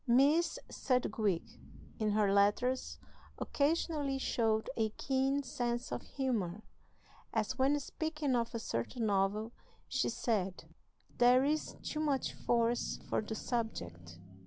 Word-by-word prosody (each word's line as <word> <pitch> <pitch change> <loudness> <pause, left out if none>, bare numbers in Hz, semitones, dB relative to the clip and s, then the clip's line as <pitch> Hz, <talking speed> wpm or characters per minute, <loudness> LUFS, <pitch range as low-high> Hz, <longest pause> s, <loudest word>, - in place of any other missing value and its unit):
Miss 290 +7 +4
Sedgwick, 220 -8 0 0.6
in 215 -2 +1
her 205 -2 +3
letters, 205 +6 +2 0.4
occasionally 290 -2 0
showed 225 -4 +1
a 220 -1 +1
keen 270 +1 +1
sense 240 -2 -2
of - - -2
humor, 220 -8 -2 0.7
as, - - -1
when 280 +3 +3
speaking 300 -2 -2
of 235 -1 -1
a - - -1
certain 220 - -2
novel, 205 +2 +1 0.4
she 260 - 0
said: 200 -6 -1 0.6
"There 250 +2 +6
is 305 +2 0
too 305 - -3
much 290 -4 0
force 235 0 +1
for - - +2
the 220 +1 -5
subject. 85 - -4
240 Hz, 120 wpm, -34 LUFS, 215-270 Hz, 0.7 s, There